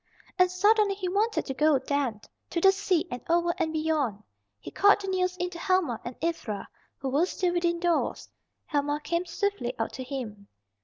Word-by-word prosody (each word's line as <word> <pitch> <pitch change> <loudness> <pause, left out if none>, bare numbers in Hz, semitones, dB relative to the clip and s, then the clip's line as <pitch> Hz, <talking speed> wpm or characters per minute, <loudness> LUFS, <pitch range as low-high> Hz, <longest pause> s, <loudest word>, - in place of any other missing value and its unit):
And 365 0 +6
suddenly 405 +2 +3
he 380 -2 -3
wanted 420 +4 +1
to 270 - -3
go 300 +1 +4
then, 265 -5 -1 0.3
to 340 - -1
the 385 +3 +7
sea 380 -3 0
and 245 - -4
over 345 0 +3
and 325 -2 0
beyond. 305 -10 -1 0.4
He - - -9
called 405 +1 +5
the 395 - -6
news 365 -1 0
in 360 0 -2
to 340 - -8
Helma 345 - +1
and 240 - -6
Ivra, 230 -12 -2 0.3
who 270 - -3
were 295 +7 +2
still 360 -1 -1
within 345 -1 +1
doors. 345 -1 0 0.4
Helma 290 -1 0
came 340 +1 -1
swiftly 345 -8 -2
out 225 - -2
to 260 - -5
him. 230 -7 -6
340 Hz, 190 wpm, -28 LUFS, 275-365 Hz, 0.4 s, the